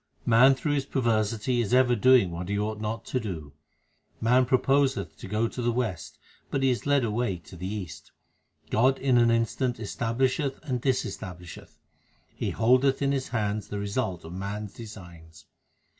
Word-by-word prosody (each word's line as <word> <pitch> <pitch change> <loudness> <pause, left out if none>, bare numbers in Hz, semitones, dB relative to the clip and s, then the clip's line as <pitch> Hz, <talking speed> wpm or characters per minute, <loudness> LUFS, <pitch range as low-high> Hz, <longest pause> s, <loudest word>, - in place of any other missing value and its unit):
Man 125 +4 +6
through 140 +3 -2
his 140 -2 -1
perversity 115 -1 0
is 120 +2 +1
ever 125 -1 +4
doing 120 -4 +5
what 85 +2 -5
he 100 - 0
ought 105 +1 -2
not 110 +1 -4
to 130 - -1
do: 80 - -6 0.7
Man 125 +2 +3
proposeth 135 +1 +1
to - - -9
go 105 +4 0
to 125 - -6
the 120 0 +1
west, 95 -10 -3 0.3
but 135 - -1
he 135 - +4
is 125 - -3
led 140 -2 +3
away 110 -3 -1
to 85 +2 -14
the 90 +3 -5
east. 90 -7 -7 0.6
God 130 +4 +3
in 130 -3 +3
an 120 0 +4
instant 115 +2 0
establisheth 130 +6 -1
and 125 -4 -2
disestablished; 95 - -4 0.6
He - - -2
holdeth 130 +4 +3
in 140 - +2
His 135 -2 -1
hands 105 -3 -2
the 105 - -5
result 100 -4 -3
of 80 - -8
man 100 +3 -4
s 105 - -9
designs. 90 -7 -12
115 Hz, 175 wpm, -27 LUFS, 100-130 Hz, 0.7 s, Man